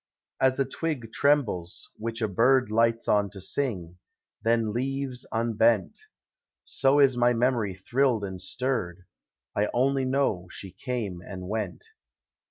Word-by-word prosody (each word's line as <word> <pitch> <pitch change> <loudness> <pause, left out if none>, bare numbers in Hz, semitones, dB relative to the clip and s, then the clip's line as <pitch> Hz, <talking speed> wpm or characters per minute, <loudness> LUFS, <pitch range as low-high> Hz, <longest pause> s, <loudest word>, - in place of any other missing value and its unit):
As 130 0 +3
a 135 - +3
twig 135 -4 -4
trembles, 115 -12 +1
which 115 +1 -4
a - - +2
bird 125 +4 +3
Lights 115 +1 +2
on 105 -1 +3
to 100 - -10
sing, 90 -6 -3 0.4
then 115 -2 +1
leaves 130 +1 -2
unbent, 115 -3 +2 0.6
So 135 +1 +2
is 135 -3 +5
my 120 0 +3
memory 115 -5 +1
thrilled 120 +3 +1
and 95 -2 -5
stirred; 95 -6 -2 0.3
— 60 +1 -47
I 105 +1 +1
only 135 +2 +2
know 130 -9 0
she 95 0 -7
came 105 -4 -4
and 90 -2 -7
went. 105 -3 -4
115 Hz, 140 wpm, -27 LUFS, 100-130 Hz, 0.6 s, is